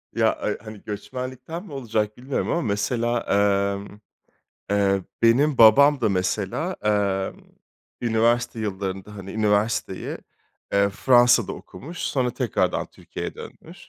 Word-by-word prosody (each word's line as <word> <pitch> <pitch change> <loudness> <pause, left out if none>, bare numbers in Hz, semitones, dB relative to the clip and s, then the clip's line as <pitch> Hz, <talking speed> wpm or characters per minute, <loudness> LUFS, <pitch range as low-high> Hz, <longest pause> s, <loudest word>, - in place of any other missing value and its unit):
Ya, - - +3
ay - - -2
hani, 110 -1 -10
göçmenlikten 130 - -6
mi 185 - -12
olacak 110 -5 -2
bilmiyorum 130 +2 -3
ama 170 - +1
mesela, 120 +2 0
emm, 100 0 0 0.7
eee, 100 -1 +2 0.2
benim 130 +5 +4
babam 140 +6 +7
da 110 - +2
mesela, 100 - -1
eee, 100 -2 +1 0.7
üniversite 115 0 +1
yıllarında, 95 0 -4
hani, 95 -1 -8
üniversiteyi, 105 0 0 0.5
eee, 100 0 +4
Fransa'da 120 +1 +4
okumuş, 155 - -10
sonra 125 -3 0
tekrardan - - -1
Türkiye'ye - - -7
dönmüş. - - -12
110 Hz, 115 wpm, -24 LUFS, 100-125 Hz, 0.7 s, babam